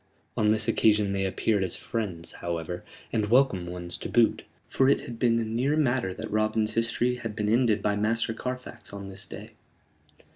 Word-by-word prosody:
On 105 -1 +2
this 110 +1 +2
occasion 105 -3 +3
they 95 0 0
appeared 100 +1 +1
as 95 - -1
friends, 95 -8 -4
however 85 0 -4 0.3
and 110 -2 +1
welcome 120 -8 +3
ones 85 -1 -5
to - - -5
boot; 120 -2 +3 0.2
for 135 0 +3
it 140 - +3
had 115 -1 -8
been 115 -1 +3
a 115 - -1
near 125 +7 0
matter 125 -9 +1
that 90 - -6
Robin's 110 +1 +1
history 120 +2 0
had 115 -3 -5
been 105 -1 -1
ended 110 -2 +3
by 105 -1 +2
Master 115 +2 0
Carfax 125 -1 -6
on 100 -1 -6
this 95 0 -9
day. - - -9
110 Hz, 185 wpm, -27 LUFS, 100-120 Hz, 0.3 s, occasion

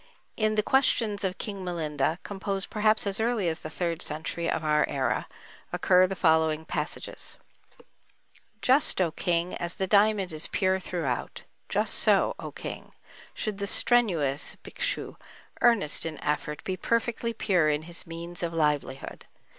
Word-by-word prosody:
In 215 -1 +1
the 210 - +2
"Questions 230 -6 +2
of 185 -1 -1
King 200 -3 -5
Milinda," 160 -3 -1
composed 195 -1 -4
perhaps 215 0 +2
as 200 +2 -1
early 225 -4 +1
as 160 -1 -1
the 155 - -7
third 170 +1 -2
century 160 +2 -3
of 160 - -1
our 150 -1 +3
era, 130 -4 -1 0.4
occur 185 0 +4
the 195 - -4
following 160 -2 +2
passages: - - -2 1.3
Just, 265 -3 +4
O 175 -3 +2
King, 175 +1 0
as 175 0 -3
the 190 - -1
diamond 200 -2 +3
is 155 - -1
pure 190 -1 +1
throughout; 165 -9 -3 0.3
just - - 0
so, - - +3
O - - -6
King, - - -8 0.4
should 210 -2 -3
the 200 - -2
strenuous 175 - +2
Bhikshu, - - -3 0.4
earnest 230 -11 +4
in 160 -2 -4
effort, 150 0 -2
be 190 - -2
perfectly 230 +2 -1
pure 185 -8 +2
in 150 +1 0
his 170 +1 -7
means 170 +1 -7
of 170 -1 -2
livelihood. 150 -4 -1
180 Hz, 150 wpm, -27 LUFS, 160-205 Hz, 1.3 s, occur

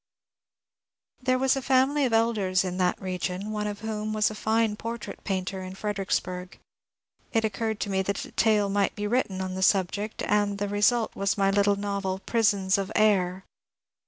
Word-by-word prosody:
There 255 0 +2
was 265 +1 +2
a 270 - -2
&mily 270 +2 +3
of - - -4
Elders 210 -5 +2
in 180 -1 -3
that 180 -1 +1
r^ion, 185 0 -3
cme 210 0 -3
of 205 0 -7
whom 215 -1 -3
was 215 0 +2
a - - -5
fine 220 0 +1
portrait 230 +1 -6
painter 190 -1 -2
in 185 0 -7
Fredericksbarg. 190 -3 -3 0.7
It 225 -1 +2
occarred 220 0 -2
to 205 - -2
me 190 0 +1
that 200 +1 -2
a - - -13
tale 215 -3 +3
might 200 0 0
be 210 - -3
written 205 -4 0
on 185 0 -3
t^ 190 0 -2
subject, 200 +3 +1
and 205 -1 +1
the 205 0 -2
re 205 +1 -3
sult 235 +1 +3
was 195 0 0
my 195 0 +3
little 200 0 +3
novel 200 -2 -2
'^ - - -35
Prisons 200 -4 +2
of 195 +1 -3
Ajr." 190 -3 +2
205 Hz, 190 wpm, -27 LUFS, 190-220 Hz, 0.7 s, mily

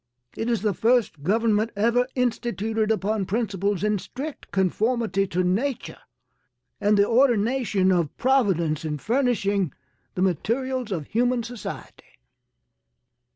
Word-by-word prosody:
It 225 - -2
is 230 -4 0
the 210 -2 +1
first 225 - +1
government 215 +5 +1
ever 235 +4 +2
instituted 225 -3 -1
upon 215 -2 0
principles 200 -3 -1
in 210 -1 +1
strict 280 - -7
conformity 200 +2 0
to 185 0 0
nature 225 +9 -1 0.8
and 205 +1 +3
the 200 0 +4
ordination 230 -5 +2
of 170 -5 0
Providence 190 - +1
in 150 -2 -3
furnishing 205 - 0 0.4
the 185 - 0
materials 245 - -1
of 165 -6 -3
human 245 - +1
society. 235 -2 -9
215 Hz, 115 wpm, -24 LUFS, 190-240 Hz, 0.8 s, the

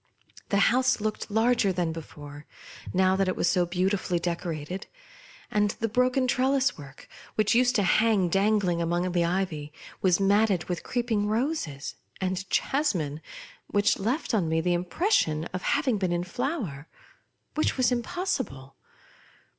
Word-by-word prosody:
The 200 - +2 0.2
house 255 -1 +2
looked 215 +1 -3
larger 225 -1 +2
than 175 -2 -1
before, 145 -2 -10 0.4
now 185 0 +3
that 195 0 +1
it 185 - 0
was - - 0
so 175 0 +2
beautifully 185 0 0
decorated; 170 0 -4 0.6
and 210 0 +2
the 225 - 0
broken 250 +3 +2
trellis 265 +2 +2
work, 140 -2 -13 0.3
which 215 +1 +2
used 250 +1 +3
to 205 - +3
hang 210 0 +3
danghng 195 -2 +2
among 175 +2 0
the 175 -1 +2
ivy, 170 -4 -2 0.3
was 185 -1 +3
matted 200 -2 +3
with 175 -2 -4
creeping 235 -4 -1
ro 240 +9 +1
ses, 150 - -5 0.3
and 185 0 -2
jasmine, 175 - 0 0.5
which 205 +1 +2
left 245 +8 -1
on 185 -7 +1
me 160 0 +1
the 175 +2 +1
im 175 +1 -1
pression 175 - +1
of 185 - -3
having 250 -3 +1
been 185 -2 0
in 175 0 0
tlower, 195 - -4 0.7
which 310 - 0
was 255 -1 +3
impossible. 240 - -3
190 Hz, 150 wpm, -27 LUFS, 175-235 Hz, 0.7 s, now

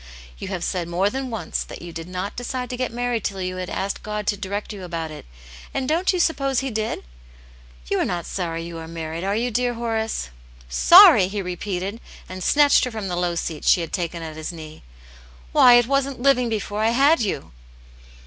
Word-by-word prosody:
" - - -19
You - - -5
have 185 -3 -4
said 175 -1 -2
more 185 +4 +1
than 265 +1 -4
once 225 -2 -3
that - - -10
you 170 -1 -8
did 165 0 -7
not 185 +2 -4
decide 250 0 -4
to - - -3
get 255 0 -2
married 240 -2 -2
till 195 -1 -3
you 185 0 -3
had 185 -1 -4
asked 195 +1 -3
God 210 0 -4
to 205 - +1
direct 205 +2 -4
you 195 -2 -8
about 165 -3 -4
it, 150 - -10 0.5
and 260 - -1
don't 335 +5 +2
you 365 - -1
suppose 275 -6 +1
He 270 -1 -3
did 220 0 -2
t - - -23 0.9
You - - +2
are - - +1
not 175 -2 -3
sorry 165 -3 -3
you 170 -1 -7
are 160 - -8
niarried, 165 0 -5
are 200 +1 0
you, 240 +3 -1
dear 245 +1 0
Horace 225 - -2 0.3
V^ - - -24
^^ - - -8
Sorry 345 - +9
r - - -5
he 205 0 -3
repeated, 185 +3 -4 0.3
and 185 0 -7
snatched 290 +5 +5
her - - -3
from 215 -5 -5
the 175 - -2
low 175 -1 -1
seat 165 -2 -4
she 180 - +4
had 165 - -6
taken 170 -2 -3
at 160 -1 -7
his 155 +3 -4
knee. 155 -2 -10 0.4
" - - -23
Why, 245 - +7
it 240 -1 +5
wasn't 275 0 0
living 250 -2 +3
before 210 -1 -3
I 220 - +3
had 275 +5 +4
you 200 -10 -3
200 Hz, 235 wpm, -23 LUFS, 170-245 Hz, 0.9 s, Sorry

